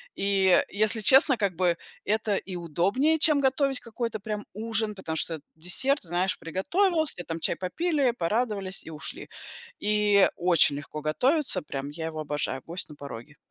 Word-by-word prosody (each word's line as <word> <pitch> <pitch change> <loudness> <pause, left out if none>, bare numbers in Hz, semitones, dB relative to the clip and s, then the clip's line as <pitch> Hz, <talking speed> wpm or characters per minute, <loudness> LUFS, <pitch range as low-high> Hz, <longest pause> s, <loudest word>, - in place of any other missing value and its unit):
И 195 -2 +3
если 215 +2 +2
честно, 265 +4 +7
как 200 -4 -1
бы, 175 -1 +1 0.3
это 215 -1 0
и 185 - -5
удобнее, 195 - 0
чем 300 -1 +5
готовить 270 0 +1
какой-то 230 -1 -5
прям 210 +1 -5
ужин. 220 0 -1
Потому 165 -5 -5
что 160 +1 -1 0.2
десерт, 220 - +2
знаешь, 180 +2 -1
приготовился, 315 - 0
там 165 0 -4
чай - - 0
попили, 285 - 0
порадовались 200 0 -1
и - - -9
ушли. 155 0 -7 0.5
И 210 -1 +3
очень 170 -5 +3
легко 150 +1 -8
готовится, 250 - +1
прям 140 -1 -6
я 160 +2 -6
его 155 -1 -6
обожаю- 145 -3 -3
"Гость 170 +1 -6
на 150 - -11
пороге". 140 0 -10
195 Hz, 155 wpm, -26 LUFS, 165-240 Hz, 0.5 s, честно